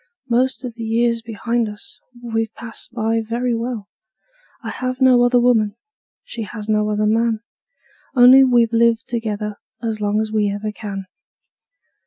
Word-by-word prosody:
Most 260 +2 +1
of 245 - -5
the 230 0 -7
years 230 +1 +1
behind 230 +1 -2
us 210 0 -12 0.2
we've 225 -2 -2
passed 230 0 -9
by 225 -1 0
very 240 +2 -1
well; 230 -3 -3 0.8
I - - -4
have 255 0 -4
no 255 -2 +5
other 245 0 +4
woman, 225 -4 +2 0.5
she 235 - -7
has 215 0 -7
no 210 -1 +1
other 210 0 0
man 225 0 +1 0.7
Only 255 +2 +8
we've 240 -3 +3
lived 230 0 +3
together 210 -3 -3 0.3
as 220 -2 -2
long 205 +1 +1
as 220 0 -2
we 210 -2 +1
ever 205 +1 -3
can. 200 -2 -6
230 Hz, 155 wpm, -20 LUFS, 215-240 Hz, 0.8 s, Only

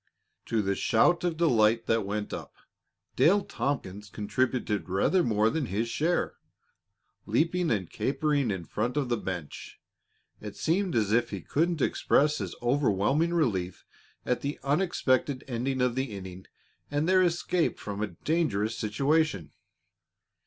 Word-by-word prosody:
To 110 -2 +1
the 100 0 +1
shout 130 - +3
of 170 -3 -1
delight 115 -8 +3
that 115 -3 +1
went 105 +1 -3
up, - - -7 0.6
Dale 195 +5 +4
Tompkins 105 - -3
contributed 110 -1 -1
rather 100 - +2
more 110 -4 +2
than 145 -1 -1
his 110 +4 -2
share. 165 +8 0 0.9
Leaping 170 +2 +1
and 100 -6 0
capering 140 - 0
in 95 -4 -3
front 125 - -2
of 135 -4 0
the 120 - +1
bench, 90 -7 -6 0.6
it 105 -1 -8
seemed 180 +2 0
as 105 -3 +1
if 120 +1 +2
he 100 - -4
couldn't 165 - 0
express 150 +1 +2
his 95 -4 -5
overwhelming 135 - +2
relief 95 - -1 0.4
at 125 - 0
the 140 +1 -3
unexpected 140 -4 +1
ending 130 +1 -2
of 125 -1 +2
the 130 +2 -1
inning 95 -5 -9 0.4
and 145 +2 0
their 185 0 +5
escape 175 0 +1
from 100 0 -6
a 110 - 0
dangerous 110 - -1
situation. 135 - 0
125 Hz, 140 wpm, -28 LUFS, 105-155 Hz, 0.9 s, their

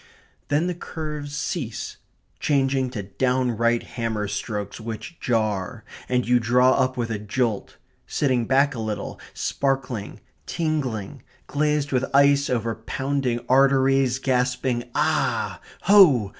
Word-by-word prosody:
Then 145 +4 +1
the 180 - -1
curves 150 -4 -6
cease, 145 -7 -4 0.4
changing 135 -2 +1
to 110 -5 -5
downright 120 +2 +1
hammer 110 -3 -3
strokes, 105 +1 -4
which 115 +9 -7
jar; 110 -1 -1 0.3
and 125 -1 +1
you 125 0 +4
draw 125 +3 +4
up 130 -1 +1
with 115 -2 -2
a 110 - -2
jolt; 105 0 -2 0.3
sitting 130 -5 +1
back 140 +3 +3
a 120 - -6
little, 110 -1 -4 0.2
sparkling, 130 -6 -2 0.3
tingling, 135 - -2 0.2
glazed 150 -1 0
with 130 -1 +1
ice 140 +1 +5
over 115 -2 0
pounding 130 +2 -2
arteries, 135 -1 +4
gasping: 125 -2 0
"Ah! - - 0 0.2
ho! 170 - +6
125 Hz, 120 wpm, -24 LUFS, 115-140 Hz, 0.4 s, ho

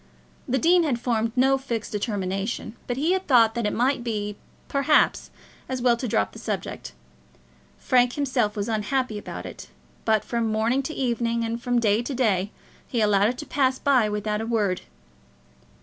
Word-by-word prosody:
The 260 - +1
dean 345 +4 +4
had 280 -8 0
formed 230 -2 0
no 270 +1 +3
fixed 235 -5 -4
determination, 205 +1 -3
but 245 - -2
he 310 +6 +1
had 375 0 0
thought 230 -4 +5
that 235 -2 -1
it - - 0
might 250 +1 +1
be, 210 -3 -3 0.3
perhaps, 280 +2 +2 0.4
as 260 -1 -2
well 240 -1 +3
to 250 - -3
drop 105 - +1
the - - -11
subject. 60 - -5 0.8
Frank 245 -1 +3
himself 255 -7 0
was 205 -1 -2
unhappy 220 +1 -1
about - - -7
it; - - -9 0.4
but 220 -1 +2
from 230 -2 -1
morning 225 +5 +1
to 275 +4 -5
evening, 235 -2 0
and 230 +1 -3
from 245 0 0
day 220 -1 +3
to 260 +3 -4
day, 205 -6 +1 0.4
he 240 - -2
allowed 210 -1 +3
it 245 - -4
to 300 - -6
pass 265 -3 +1
by 255 -7 +3
without 210 +1 -2
a - - -3
word. 210 -6 0
235 Hz, 180 wpm, -25 LUFS, 215-260 Hz, 0.8 s, thought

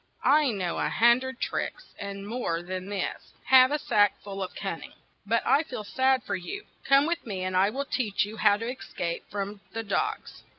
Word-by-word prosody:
"I 295 -1 +5
know 185 -6 -2
a - - +1
hun 235 +1 +5
dred 260 0 -6
tricks, - - -3
and 200 0 -6
more 205 -8 -2
than 185 +1 -5
this, 200 -2 -4
have 260 -1 +7
a 295 - +2
sack 205 -8 +2
full 195 -1 -6
of 185 - -5
cun - - -4
ning. - - -11 0.3
But 230 +2 +1
I 275 +4 +5
feel 255 -8 -6
sad 260 +3 +2
for - - -2
you: 290 - -6 0.2
come 275 +1 +5
with 335 +1 -1
me, 195 -5 -4
and 185 0 -2
I 190 +2 +4
will 275 +5 -3
teach 220 -8 0
you 215 +2 -9
how 205 -1 +4
to 230 +2 -4
es 255 +1 -7
cape 170 -1 -3
from 200 0 -4
the 225 - -3
dogs." 420 - -2
215 Hz, 215 wpm, -27 LUFS, 195-260 Hz, 0.3 s, have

